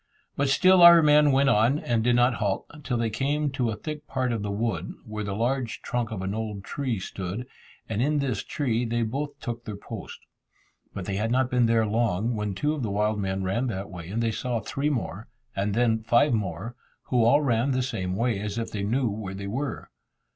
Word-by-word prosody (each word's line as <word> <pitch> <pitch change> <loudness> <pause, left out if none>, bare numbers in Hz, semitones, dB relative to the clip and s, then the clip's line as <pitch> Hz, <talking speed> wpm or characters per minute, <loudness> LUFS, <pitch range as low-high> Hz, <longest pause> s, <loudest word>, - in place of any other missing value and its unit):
But 140 0 +1
still 185 +6 +5
our 170 -1 +10
men 150 -1 +6
went 135 +1 +4
on, 120 +4 +4
and 120 -6 0
did 120 +1 +3
not 120 +1 +4
halt, 100 -2 0 0.2
till 125 -3 -1
they 115 -1 0
came 145 +5 0
to 125 -3 0
a 110 - -2
thick 150 +7 -7
part 130 -2 -1
of 115 -3 -1
the 105 - -3
wood, 100 -4 -2
where 110 -1 -5
the 100 -1 -3
large 120 +1 -1
trunk 120 -2 -2
of 100 -4 -5
an 95 +1 -2
old 105 -3 -4
tree 125 -2 -2
stood, 95 +5 -5 0.4
and 110 0 -1
in 150 +3 +2
this 130 -8 -1
tree 120 -5 -1
they 120 0 0
both 140 +6 -4
took 120 -1 -5
their 105 - -6
post. 110 0 -8 0.7
But 95 - -6
they 95 0 -2
had 110 +2 0
not 130 +1 +1
been 125 -2 +3
there 115 -1 +3
long, 110 0 0
when 105 -2 -2
two 145 +9 0
of 150 - -4
the 110 - -2
wild 105 +1 0
men 95 -1 -2
ran 100 +8 0
that 100 -3 -4
way, 90 -2 -8
and 115 +4 -1
they 115 - +1
saw 120 +1 -2
three 140 +7 -2
more, 115 -6 -3 0.3
and 100 +1 -1
then 115 -2 +2
five 120 +5 +3
more, 110 +2 -3 0.3
who 125 -3 +3
all 140 +6 +5
ran 120 0 +1
the 130 -1 +1
same 95 -8 -3
way, 115 -1 0
as 105 +1 -4
if 115 - -3
they 105 - -3
knew 120 +6 +1
where 100 -2 -4
they 100 0 -6
were. 130 +7 -4
115 Hz, 225 wpm, -26 LUFS, 105-130 Hz, 0.7 s, our